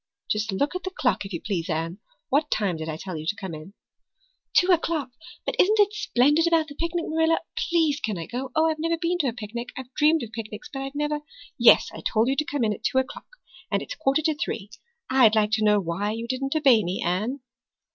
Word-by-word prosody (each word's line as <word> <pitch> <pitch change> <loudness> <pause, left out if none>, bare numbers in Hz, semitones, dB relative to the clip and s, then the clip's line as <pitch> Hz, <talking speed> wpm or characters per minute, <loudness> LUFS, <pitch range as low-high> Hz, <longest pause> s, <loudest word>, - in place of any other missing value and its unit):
"Just 215 0 0
look 285 - -1
at 365 - -2
the 375 - -4
clock, 275 - 0
if - - -15
you 170 - -3
please, 185 -3 -3
Anne. 165 +3 -2 0.3
What 295 +3 +2
time 200 -5 0
did 160 0 -5
I 155 - -4
tell 185 +1 -6
you 155 0 -6
to 205 - 0
come 190 -4 -6
in?" 155 +6 -10 0.8
"Two 365 +1 +4
o'clock 320 -6 +1 0.3
but - - -2
isn't 425 +4 +5
it 415 0 +4
splendid 295 - +3
about 325 -2 +2
the - - -8
picnic, 335 +3 -2
Marilla? 320 +1 +2 0.3
Please 320 -4 +2
can 215 -4 -2
I 165 - -5
go? 255 +3 -5
Oh, 315 0 +4
I've 315 -1 0
never 330 +1 0
been 345 +1 -1
to 285 - +1
a - - +1
picnic 235 +1 -6
I've 260 -1 -8
dreamed 310 +1 +3
of 225 - -7
picnics, 225 +4 -7
but 270 - -4
I've 270 +1 -6
never 295 0 -1 0.3
" - - -25
"Yes, - - +5
I - - -8
told 225 +2 +1
you 270 - +1
to 305 - +1
come 290 -4 -2
at 210 -2 -2
two - - 0
o'clock. 260 - -2 0.4
And - - 0
it's - - -6
a - - -14
quarter 290 0 +2
to 315 0 +2
three. 225 -8 -4 0.4
I'd 250 -4 +5
like 210 -1 +2
to 220 -1 +1
know 210 -1 +4
why 195 +4 -2
you 230 +1 -5
didn't 270 +3 -2
obey 265 -8 +5
me, 180 +2 -2
Anne." 215 +10 -1
260 Hz, 240 wpm, -25 LUFS, 210-315 Hz, 0.8 s, isn't